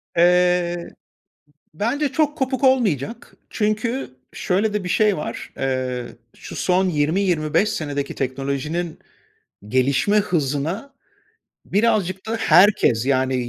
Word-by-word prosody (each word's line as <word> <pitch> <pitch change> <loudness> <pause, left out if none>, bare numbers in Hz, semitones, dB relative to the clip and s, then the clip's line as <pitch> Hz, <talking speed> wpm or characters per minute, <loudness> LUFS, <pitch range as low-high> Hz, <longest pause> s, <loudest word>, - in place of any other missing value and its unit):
Eee, 180 0 +3 0.2
ı - - -25 0.8
bence 265 - 0
çok 295 +2 0
kopuk 265 0 -1
olmayacak. 230 - 0
Çünkü 215 - -1 0.2
şöyle 205 +4 0
de 210 -3 -2
bir - - -3
şey 210 +2 +2
var: 150 - -6
Eee, 130 -2 -2 0.3
şu - - -10
son 185 +1 +2
20-25 165 +3 +1
senedeki 145 -8 -3
teknolojinin 140 +6 -3 0.7
gelişme 135 - +2
hızına 170 - -1 0.7
birazcık 200 -3 0
da 225 - -1
herkes, 165 - +4
yani 130 -2 +1
180 Hz, 105 wpm, -21 LUFS, 140-215 Hz, 0.8 s, herkes